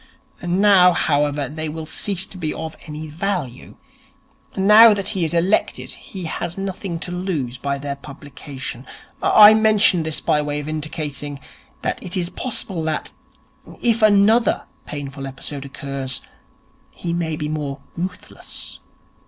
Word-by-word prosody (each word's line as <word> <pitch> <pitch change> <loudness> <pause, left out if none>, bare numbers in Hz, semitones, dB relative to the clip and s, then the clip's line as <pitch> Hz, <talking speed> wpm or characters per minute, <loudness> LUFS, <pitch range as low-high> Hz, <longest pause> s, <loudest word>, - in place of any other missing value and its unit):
Now, 180 0 +5
however, 145 -3 +1
they 155 +3 -5
will 160 +1 -5
cease 190 +3 -1
to 190 - -10
be 155 -3 -2
of 160 0 -5
any 155 +1 -6
value. 155 -5 -4 0.8
Now 210 +3 +8
that 200 -1 -1
he 190 -5 -1
is 160 - 0
elected 175 +5 +1
he 190 -2 -9
has 170 +1 -4
nothing 195 -2 -4
to 180 - -3
lose 160 -9 -3
by 140 +1 -1
their 140 0 -4
publication. 140 -3 -8 0.3
I 210 0 +9
mention 215 -5 +4
this 160 -1 -2
by 150 - +2
way 145 0 -2
of 150 - -6
indicating 150 -2 -4 0.4
that - - -2
it 180 +1 -3
is 175 -1 -1
possible 195 -6 -3
that, 155 -1 -2 0.7
if 230 -1 +1
another 215 +2 +4 0.2
painful 140 -2 -6
episode 135 +1 -7
occurs, 135 -2 -4 0.7
he 170 -1 -5
may 165 -2 -1
be 150 -1 -3
more 145 -2 -4
ruthless.' 180 +2 -6
160 Hz, 140 wpm, -21 LUFS, 145-190 Hz, 0.8 s, I